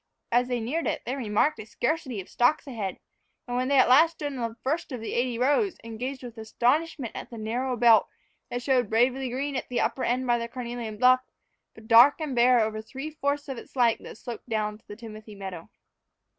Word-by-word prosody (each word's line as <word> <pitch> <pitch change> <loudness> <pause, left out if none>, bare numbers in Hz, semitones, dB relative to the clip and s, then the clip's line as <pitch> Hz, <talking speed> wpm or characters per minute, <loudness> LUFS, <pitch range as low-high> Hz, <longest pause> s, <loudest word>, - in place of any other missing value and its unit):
As 245 +1 +3
they 245 -1 -1
neared 275 +9 -2
it - - -2
they 255 - -2
remarked 250 +4 +1
a 215 - -7
scarcity 255 -2 -2
of 185 - -8
stalks 245 +6 +2
ahead; 215 -9 -4 0.5
and 245 - -3
when 255 +1 0
they 280 0 +3
at 260 - +6
last 315 +7 +6
stood 290 -3 -5
on 235 -3 -2
the 225 - -15
first 310 +4 -2
of 250 - -4
the 225 - -5
eighty 245 -1 0
rows, 290 - +2
they 230 - -8
gazed 260 +3 -5
with 240 -2 -9
astonishment 250 +4 0
at - - -7
the 235 - -9
narrow 245 +4 -2
belt 230 -1 +6 0.4
that 245 0 -4
showed 250 -4 +2
bravely 250 +3 +2
green 275 +3 -3
at 260 - -4
the 245 - -1
upper 265 - 0
end 250 +2 0
by 240 -1 +2
the 235 - -3
carnelian 235 -3 -6
bluff, 255 +2 +5 0.5
but 220 0 -14
dark 240 +7 +7
and 300 -5 -3
bare 245 0 +5
over 215 0 -1
the 220 - -25
three 275 +5 -6
fourths 285 0 -2
of 265 -4 -5
its - - -15
length 240 -3 +3
that - - -10
sloped 240 0 -8
down 210 -1 -2
to 225 - -35
the 205 - -8
timothy 215 -1 -10
meadow. 190 -4 -8
245 Hz, 225 wpm, -27 LUFS, 225-265 Hz, 0.5 s, dark